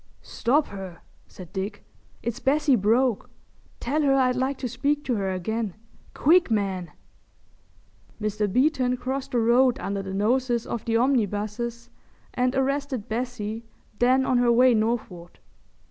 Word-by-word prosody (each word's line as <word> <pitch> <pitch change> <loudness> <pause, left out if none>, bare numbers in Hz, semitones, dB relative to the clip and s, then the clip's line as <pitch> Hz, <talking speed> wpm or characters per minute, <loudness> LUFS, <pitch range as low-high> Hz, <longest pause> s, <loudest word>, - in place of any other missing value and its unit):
"Stop 285 +5 +1
her," 190 -3 -8 0.3
said 180 -3 -12
Dick. 200 +2 -5 0.4
"It's 235 +1 -3
Bessie 285 0 +3
Broke. 230 +2 +1 0.5
Tell 290 +6 0
her 275 -2 +3
I'd 255 -2 +3
like 260 +2 -1
to 260 - -3
speak 280 +5 -1
to 255 - -1
her 195 -1 -1
again. 200 +2 -3 0.4
Quick, 340 +3 +4
man!" 195 -5 -1 1.3
Mr. 210 -1 -1
Beeton 255 0 +2
crossed 265 +2 -4
the 240 - +3
road 245 +2 +4
under 200 0 -3
the 190 0 -6
noses 240 +3 +1
of 235 - -4
the 230 -1 +1
omnibuses 235 -1 -1 0.4
and 250 +1 0
arrested 270 -3 -1
Bessie 225 -1 -3 0.4
then 255 +2 +4
on 255 -2 +2
her 245 -1 +4
way 250 +1 +5
northward. 215 -6 -2
240 Hz, 140 wpm, -25 LUFS, 210-260 Hz, 1.3 s, way